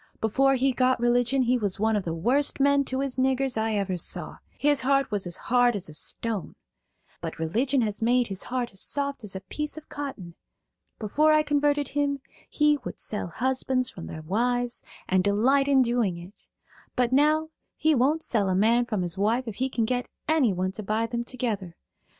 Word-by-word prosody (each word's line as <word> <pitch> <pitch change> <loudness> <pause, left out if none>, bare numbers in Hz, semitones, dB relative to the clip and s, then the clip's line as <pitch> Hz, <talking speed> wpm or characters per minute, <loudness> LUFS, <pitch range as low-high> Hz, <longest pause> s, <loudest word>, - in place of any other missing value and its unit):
Before 270 +5 +2
he 265 +1 +1
got 255 0 +2
religion 245 +2 +2
he 250 +1 +2
was 205 -3 -1
one 220 +1 +2
of 205 - -1
the 165 - -2
worst 255 - +2
men 280 0 +4
to 260 +1 -2
his 275 -2 -2
niggers 265 0 +1
I 220 0 0
ever 195 -3 -1
saw; 170 - -1 0.2
his 290 -1 +3
heart 275 0 +1
was 200 -3 -1
as 175 - -2
hard 245 -1 +2
as 195 -2 -3
a - - -10
stone. 210 +5 -2 0.7
But - - -5
religion 240 - 0
has 210 -1 -3
made 245 +2 +3
his 195 -3 -3
heart 245 -1 -3
as 190 - -5
soft 280 -3 -1
as 200 -2 -4
a 190 - -5
piece 300 +11 -4
of 310 - -11
cotton. 265 -12 -6 0.6
Before 300 +9 +2
I 305 0 +4
converted 290 -1 +1
him 285 -1 -1 0.3
he 300 -1 +2
would - - -7
sell 210 -4 -2
husbands 255 +5 -1
from 170 - -9
their 155 - -8
wives 245 +7 0 0.2
and 185 0 +2
delight 250 +8 +3
in 270 -2 +5
doing 235 -7 0
it; 175 +4 -13 0.5
but 250 -1 +1
now 305 +3 +3 0.3
he 315 0 +2
won't 295 +5 +2
sell 205 -5 +1
a 185 - +1
man 230 +5 +3
from 210 -6 -1
his 175 +2 -3
wife 225 +5 +1
if 215 - -6
he 260 +1 0
can 235 -3 0
get 250 +2 -1 0.2
anyone 205 - +1
to 215 - -6
buy 215 +2 -1
them 235 +1 -3
together. 220 -8 -3
245 Hz, 195 wpm, -26 LUFS, 205-275 Hz, 0.7 s, in